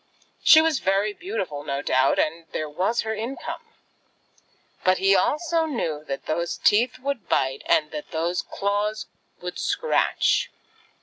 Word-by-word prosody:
She 315 - +8
was 320 -3 +1
very 195 +2 +1
beautiful 335 - -4
no 140 -1 -3
doubt, 130 0 +2
and 165 +1 -1
there 155 - -2
was 185 +10 0
her 220 0 -3
income; 230 +5 -5 1.2
but 185 0 +4
he 195 +1 +4
also 320 - +1
knew 160 - -3
that 135 - -5
those 170 +2 -2
teeth 245 +5 +3
would 275 -1 -4
bite 135 0 +1
and 150 -1 +2
that 150 - -7
those 170 +2 -1
claws 205 +2 -2 0.4
would 180 0 -6
scratch. 480 - +1
195 Hz, 140 wpm, -24 LUFS, 155-250 Hz, 1.2 s, She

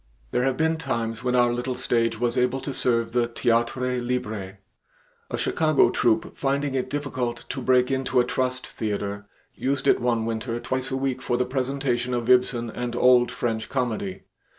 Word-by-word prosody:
There 125 - +1
have 135 -1 0
been 160 0 +2
times 115 -6 -3
when 125 0 +1
our 120 -1 +4
little 125 +1 -2
stage 115 -2 0
was 120 0 0
able 125 +1 +1
to 140 - -4
serve 115 -3 +1
the 120 0 +2
theatre 120 +2 0
libre. 110 -6 -3 0.7
A - - -2
Chicago 155 -2 +3
troupe, 110 -2 +1
finding 140 0 0
it 130 -1 -1
difficult 130 -4 -3
to 135 - -4
break 125 0 +3
into 130 -1 +1
a - - +5
trust 130 0 -1
theater, 100 -2 -4 0.3
used 140 +1 -2
it - - +5
one 120 -2 +1
winter 115 +1 -2
twice 130 +2 -2
a 130 - -1
week 135 -1 -1
for 120 -1 0
the 125 - +1
presentation 130 -1 -1
of 120 +1 +1
Ibsen 125 -2 +3
and 120 0 -4
old 125 0 +5
French 110 -2 -2
comedy. 115 -7 -2
125 Hz, 175 wpm, -25 LUFS, 115-130 Hz, 0.7 s, a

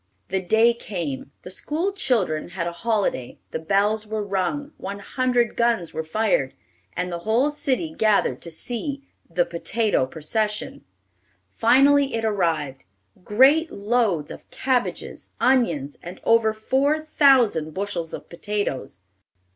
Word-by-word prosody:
The 190 0 0
day 220 +6 +4
came. 165 - -5
The 180 - -8
school 315 - -2
children 210 - 0
had 170 - -1
a 170 - -2
holiday, 190 - -1
the - - -3
bells 205 +5 +1
were 215 0 -2
rung, 200 +10 -2
one 200 +1 -6
hundred 245 +2 0
guns 235 -7 +1
were 160 - -3
fired, 160 -6 0 0.4
and 180 0 -3
the 170 - -3
whole 230 +10 +1
city 295 +2 -1
gathered 215 -2 +2
to 170 - -6
see 275 - -5 0.2
the 175 +1 +1
"potato 205 - 0
procession." 210 - -2 0.7
Finally 275 +3 +4
it 225 0 -1
arrived, 160 -10 -1 0.4
great 275 - +4
loads 200 -7 0
of - - -11
cabbages, 255 -2 -2
onions, 170 - +1
and 175 +2 -9
over 230 -1 +4
four 265 +7 +1
thousand 255 - +3
bushels 190 -5 -3
of - - -7
potatoes. 170 - -4
215 Hz, 130 wpm, -23 LUFS, 170-250 Hz, 0.7 s, day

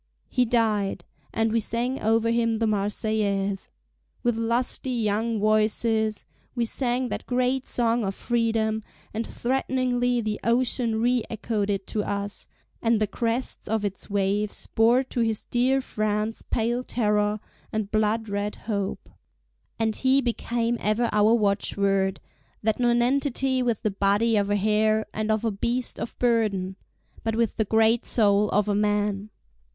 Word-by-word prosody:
He 250 -1 +2
died, 220 -4 0 0.3
and 225 0 0
we 230 - +2
sang 235 +4 -1
over 225 +1 +2
him 230 -1 +1
the 225 - 0
Marseillaise. 205 -1 -1 0.5
With 240 -1 +2
lusty 235 +3 -1
young 225 -1 0
voices 215 +1 +1 0.3
we 240 -2 +1
sang 250 +1 -1
that - - -5
great 255 +1 0
song 235 -1 +1
of 195 -1 -2
freedom; 225 -2 0 0.3
and 225 +2 -3
threateningly 250 -1 0
the 215 -2 -2
ocean 235 -1 +2
re 245 0 +2
echoed 215 -2 -2
it 195 -1 -1
to 210 - -2
us, 200 0 -4 0.3
and 230 -1 +2
the 215 - +2
crests 230 +4 -3
of 220 -1 0
its 195 +1 -5
waves 200 +1 -1
bore 235 +4 +4
to 255 - -5
his 225 -2 0
dear 260 +2 +2
France 215 -2 -2
pale 240 +2 -1
terror, 210 -3 0 0.3
and 215 -2 -3
blood 220 +1 +1
red 205 0 -2
hope. 200 -3 -4 0.7
And 220 -1 0
he 265 +1 +3
became 235 -1 -1
ever 220 +3 +1
our 210 +2 +4
watchword, 200 -2 +1 0.4
that 220 +1 +1
nonentity 255 +2 +2
with 235 -4 -1
the 215 - +1
body 200 +4 +2
of 200 -1 +1
a 205 - +2
hare, 215 +1 +2
and 215 0 -2
of 220 +1 +1
a 225 - +1
beast 235 +5 -2
of - - -5
burden—but 220 -1 -2
with 230 -2 0
the 220 - +1
great 225 +2 +3
soul 205 -2 +3
of 210 +1 +1
a 205 - +1
man! 205 0 0
220 Hz, 145 wpm, -25 LUFS, 210-235 Hz, 0.7 s, bore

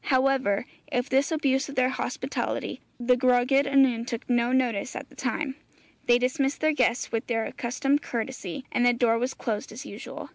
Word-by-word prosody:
However, 260 -6 +2 0.3
of 245 0 0
this 270 +4 +2
abuse 275 -3 +1
of 280 - -7
their 255 0 +3
hospitality 260 - -3 0.2
the 245 +1 +3
Gwragedd 255 +2 +3
Annwn 265 -4 +3
took 235 -2 -4
no 240 0 +2
notice 255 -3 0
at - - -6
the - - -18
time. 300 -4 -2 0.5
They 240 - +6
dismissed 270 +3 0
their 310 0 +3
guests 250 -3 +1
with 225 -1 -2
their 225 -2 0
accustomed 275 +4 0
courtesy, 235 -3 -4
and 245 - +1
the 245 0 +5
door 235 -1 +2
was 250 +2 -2
closed 215 -4 -3
as 250 +7 -8
usual. - - -8
255 Hz, 180 wpm, -27 LUFS, 240-270 Hz, 0.5 s, They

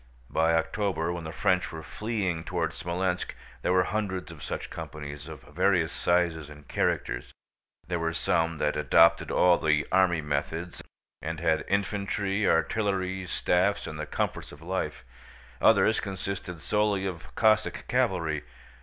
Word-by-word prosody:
By 80 +1 +3
October, 85 0 0
when 85 -2 -5
the 80 - -5
French 90 +3 +1
were 80 -1 -7
fleeing 100 -7 -2
toward - - -1
Smolénsk, 90 +1 -2 0.3
there - - +1
were 90 0 +4
hundreds 95 -3 -2
of 80 -3 -12
such - - -5
companies, 75 0 -7
of 75 -3 -9
various 85 +1 +1
sizes 85 -4 +1
and 75 -2 -13
characters. - - -1 0.6
There 85 0 -1
were 80 0 0
some 80 0 +1
that 75 - 0
adopted 85 +3 +4
all 90 -1 +4
the 75 -1 +2
army 90 -3 +4
methods 80 +4 -3 0.4
and 80 0 -4
had 80 -1 +1
infantry, 100 0 0
artillery, 95 +2 +1
staffs, 90 +3 +1
and - - -6
the - - -4
comforts - - -2
of 75 +2 -13
life. 95 +2 -3 0.6
Others 110 - +5
consisted 95 -3 -5
solely 105 +2 +1
of 90 -4 -6
Cossack 110 -1 +2
cavalry. 80 -3 +1
85 Hz, 145 wpm, -28 LUFS, 80-95 Hz, 0.6 s, Others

